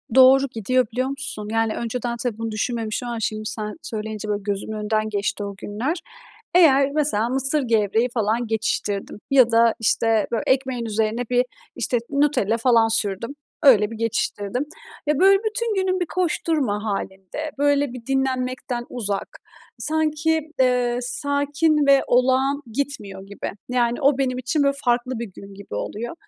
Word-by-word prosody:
Doğru, 265 +1 +7
gidiyor 255 +3 +1
biliyor 255 +3 -1
musun? 270 -7 -5
Yani 225 -1 +1
önceden 235 0 -3
tabii 235 -3 -2
bunu 225 -1 -4
düşünmemiş 225 +1 -2
ama 240 -1 -4
şimdi 215 0 -3
sen 215 -1 -4
söyleyince 215 -1 -5
böyle 205 0 -1
gözümün 205 +1 -3
önünden 215 0 -1
geçti 205 0 -2
o 200 -1 -5
günler. 240 - -3 0.6
Eğer 280 -6 +6
mesela 280 -7 +1
mısır 270 +3 +2
gevreği 225 0 +2
falan 225 +1 0
geçiştirdim 210 -2 -2
ya 255 -4 +6
da, 230 0 +4
işte, 225 -1 +2
bö 230 - +1
ekmeğin 260 -2 +1
üzerine 220 +2 0
bir, 245 0 +3 0.3
işte, 245 - +1
Nutella 280 -7 +2
falan 230 -2 +4
sürdüm. 215 +1 -1 0.3
Öyle 220 -7 +6
bir 225 - -7
geçiştirdim. 230 +1 -1 0.4
Ya, 300 -1 +1
böyle, 390 +1 +6
bütün 440 +1 -2
günüm 375 -1 0
bir 355 - 0
koşturma 305 - -1
hâlinde, 195 - -4
böyle, 285 -2 +2
bir 245 -1 -10
dinlenmekten 255 -2 -1
uzak, 205 -5 -4 0.4
sanki, 315 +1 +1 0.2
eee, 250 -1 +2
sakin 285 +3 +1
ve 275 -1 +6
olağan 260 +3 +2
gitmiyor 215 -7 -4
gibi. 200 - -5 0.2
Yani 240 0 +1
o 275 -1 +3
benim 255 -2 0
için, 270 +4 0
böyle, 280 0 +2
farklı 245 0 +1
bir 230 -5 -6
gün 195 +1 -12
gibi 200 - -10
oluyor. 230 - -4
245 Hz, 155 wpm, -22 LUFS, 215-275 Hz, 0.6 s, Doğru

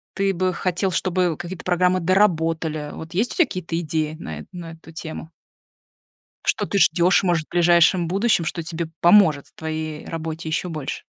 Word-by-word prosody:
ты 195 0 +1
бы 185 +1 0
хотел, 185 +2 -1
чтобы 180 -1 0
какие-то 175 0 -7
программы 180 +1 +2
доработали? 165 -5 +1
Вот 160 +2 -9
есть 215 +7 0
у - - -8
тебя 345 - +5
какие-то 175 -7 -4
идеи 155 -1 -2
на 80 - -6
эту - - -11
на 170 -2 -7
эту 160 0 -14
тему? 160 0 -7 1.2
Что - - +1
ты 200 - -1
ждешь, 175 +2 +4
может, 170 -4 +1
в - - -61
ближайшем 175 0 +4
будущем, 195 -1 +2
что 170 +1 -3
тебе 165 0 -4
поможет 170 -6 +5
в - - -23
твоей 155 -1 -5
работе 160 0 -5
еще 160 +3 -2
больше? 155 -5 -5
170 Hz, 180 wpm, -22 LUFS, 160-185 Hz, 1.2 s, тебя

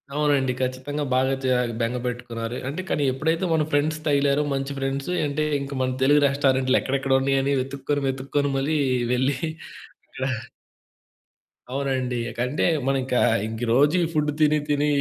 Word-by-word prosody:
అవునండి. 145 -3 +2
ఖచ్చితంగా 130 +3 -2
బాగా 130 +1 +2
జా 130 -1 +2 0.2
బెంగపెట్టుకున్నారు. 120 -1 -3
అంటే 155 +7 -3
కానీ 145 - +1
ఎప్పుడైతే 160 +6 0
మన 155 -1 +2
ఫ్రెండ్స్ 155 +2 +1
తగిలారో 140 0 +2
మంచి 135 +1 -3
ఫ్రెండ్సు, 135 +4 -2 0.2
అంటే 150 +2 -1 0.2
ఇంక 140 0 -5
మన 130 0 -1
తెలుగు 145 +2 +5
రెస్టారెంట్లు 135 -2 +2
ఎక్కడెక్కడ 135 0 0
ఉన్నయని 135 +1 +1
వెతుక్కొని, 140 +2 -3
వెతుక్కొని 135 +2 -1
మరీ 150 +3 0 0.4
వెళ్లి 130 +2 +1 0.7
అక్కడ 130 - -7 1.5
అవునండి. 130 -3 -1
ఇకంటే 125 +6 -1 0.2
మనం 135 -1 +2
ఇక 125 - -2 0.3
ఇంకీ 115 +2 -4
రోజు 145 +7 +4
ఈ - - +2
ఫుడ్ 150 -1 +1
తిని 150 0 +4
తిని 145 0 +2
135 Hz, 140 wpm, -24 LUFS, 130-145 Hz, 1.5 s, తెలుగు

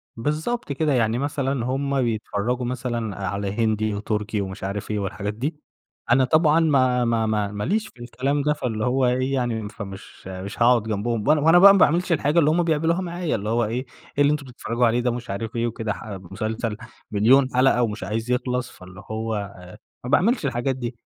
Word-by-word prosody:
بالضبط 150 - -2
كده، 150 0 +1
يعني 115 -1 +2
مثلًا 135 -2 -1
هُم 135 +1 0
بيتفرجوا 115 +1 -1
مثلًا 120 -4 -3
على 100 0 -2
هندي، 110 -1 0
وتركي 105 +1 -2
ومش 95 -1 -6
عارف 100 +2 -4
إيه 105 - -1
والحاجات 100 +1 -3
دي، 145 +8 -4 0.5
أنا 130 +2 +5
طبعًا 155 +3 +4
ما 130 -6 +3
ما 115 -1 +1
ما 105 -2 0
ما 105 0 -4
ليش 215 - 0
في 120 - -19
الكلام 130 +4 -1
ده 150 +1 +2
فاللي 115 -5 -3
هو 130 +1 +2
إيه 130 +2 +1
يعني 115 -5 -1
فمش 100 -4 -10
مش 95 +3 -7
هاقعد 120 -1 +5
جنبهم، 110 +1 -2
وأنا 155 -1 +4
وأنا 165 +4 +6
بَقى 200 +1 +9
ما 195 - +3
باعملش 175 +4 +3
الحاجة 155 0 +2
اللي 150 -2 +4
هُم 175 +2 +2
بيعملوها 165 +2 +1
معايا 175 -2 -2
اللي 105 0 -3
هو 115 0 +2
إيه، 125 +5 -3 0.3
إيه - - +3
اللي 145 - +4
أنتم 145 -2 -2
بتفرجوا 120 -1 -1
عليه 120 +2 +1
ده؟ 125 0 +1
ومش 120 -1 -5
عارف 110 +4 -4
إيه 115 0 0
وكده 110 -2 -3
ح - - -10
مسلسل 105 +4 -4 0.3
مليون 125 +6 +5
حلقة 125 -1 +4
ومش 110 -3 -3
عايز 110 +5 -3
يخلص، 125 0 -1
فاللي 95 +1 -13
هو 110 -2 -3 0.5
ما 125 - -4
باعملش 220 - +3
الحاجات 130 +1 -1
دي، 120 -1 -5
120 Hz, 195 wpm, -23 LUFS, 110-140 Hz, 0.5 s, بَقى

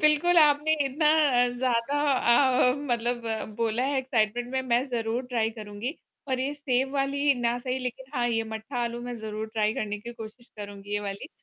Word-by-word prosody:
बिल्कुल, 305 +3 +4
आपने 300 0 +5
इतना 280 +3 0 0.5
ज़्यादा 255 +3 +1 0.7
अ, - - -3
मतलब 240 -3 -1 0.3
बोला 230 +1 0
है 275 0 +1
एक्साइटमेंट 240 -2 0
में, 265 - +1
मैं 245 0 +1
ज़रूर 240 0 -2
ट्राय 230 -3 0
करूँगी। 215 +5 -6 0.3
और 260 -1 0
ये 270 +2 -1
सेब 265 -2 0
वाली 280 +1 +2
ना 240 0 +1
सही 255 +1 -2
लेकिन 250 +1 -5
हाँ 245 -2 +1
ये 225 -1 +1
मट्ठा 220 +4 -6
आलू 235 0 -4
मैं 245 0 -5
ज़रूर 215 0 -5
ट्राय 215 -1 +2
करने 210 -1 -3
की 235 +3 -8
कोशिश 235 +1 -10
करूँगी 205 -1 -8
ये 205 - 0
वाली। 200 +4 -5
245 Hz, 180 wpm, -27 LUFS, 220-265 Hz, 0.7 s, आपने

